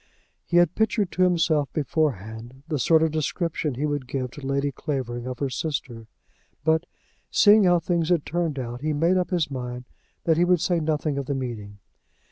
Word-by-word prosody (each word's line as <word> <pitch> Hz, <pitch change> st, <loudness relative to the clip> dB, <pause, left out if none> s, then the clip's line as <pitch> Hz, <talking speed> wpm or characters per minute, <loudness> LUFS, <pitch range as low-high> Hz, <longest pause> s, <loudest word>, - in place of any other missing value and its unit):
He 175 Hz, -, 0 dB
had 175 Hz, -1 st, +4 dB
pictured 220 Hz, -3 st, +1 dB
to 185 Hz, -, -2 dB
himself 165 Hz, -5 st, +2 dB
beforehand 130 Hz, -, -2 dB
the 155 Hz, -3 st, -2 dB
sort 160 Hz, +3 st, +4 dB
of 160 Hz, -, +1 dB
description 155 Hz, -1 st, -2 dB
he 140 Hz, +5 st, -1 dB
would 145 Hz, -3 st, -2 dB
give 130 Hz, -2 st, -3 dB
to 145 Hz, -, -10 dB
Lady 140 Hz, +1 st, 0 dB
Clavering 125 Hz, -4 st, -4 dB
of 130 Hz, -1 st, -4 dB
her 140 Hz, +1 st, -1 dB
sister; 125 Hz, -5 st, -4 dB, 0.6 s
but, 160 Hz, +2 st, +2 dB, 0.4 s
seeing 210 Hz, -1 st, +6 dB
how 175 Hz, -1 st, +5 dB
things 170 Hz, 0 st, 0 dB
had 170 Hz, -4 st, +2 dB
turned 165 Hz, -3 st, -1 dB
out, 120 Hz, -1 st, -5 dB
he 155 Hz, +1 st, 0 dB
made 165 Hz, +5 st, +2 dB
up 180 Hz, -, 0 dB
his 170 Hz, -6 st, 0 dB
mind 125 Hz, -1 st, -5 dB, 0.4 s
that 160 Hz, -2 st, +2 dB
he 170 Hz, -, +4 dB
would 180 Hz, 0 st, +3 dB
say 175 Hz, +1 st, +1 dB
nothing 155 Hz, -2 st, -1 dB
of 135 Hz, -, -5 dB
the 140 Hz, -, -1 dB
meeting. 110 Hz, -6 st, -5 dB
150 Hz, 190 wpm, -25 LUFS, 130-170 Hz, 0.6 s, seeing